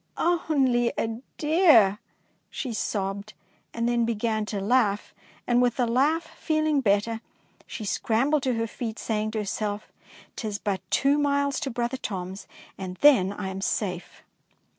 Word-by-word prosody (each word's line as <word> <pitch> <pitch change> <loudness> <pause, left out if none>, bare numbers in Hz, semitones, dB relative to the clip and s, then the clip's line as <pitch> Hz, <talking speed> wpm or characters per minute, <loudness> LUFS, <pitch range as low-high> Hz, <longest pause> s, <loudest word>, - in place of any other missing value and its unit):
Only 275 -8 +2
a 225 +1 -2 0.2
deer," 295 - +5 0.5
she 250 -4 -4
sobbed, 200 0 -3 0.4
and 230 0 -1
then 240 -1 +2
began 220 -1 -1
to 205 - -3
laugh, 210 -1 +1 0.3
and 245 0 +3
with 245 -2 +2
the 250 - +2
laugh, 280 +8 +2 0.2
feeling 310 -3 +1
better, 220 +1 +1 0.5
she 215 - -6
scrambled 265 +8 +1
to 260 -2 0
her 225 0 0
feet, 225 0 -5
saying 215 -1 -1
to 220 - -4
herself, 210 0 -3 0.2
" - - -22
T 220 - -4
is 205 -1 -3
but 200 -2 -2
two 275 +8 +3
miles 280 -1 +1
to 275 - -3
brother 240 +1 -2
Tom's 190 -3 -5 0.3
and 185 -1 -5
then 235 -11 +6
I 205 -1 -5
am 190 0 -5
safe." 185 -3 -3
230 Hz, 155 wpm, -26 LUFS, 205-270 Hz, 0.5 s, then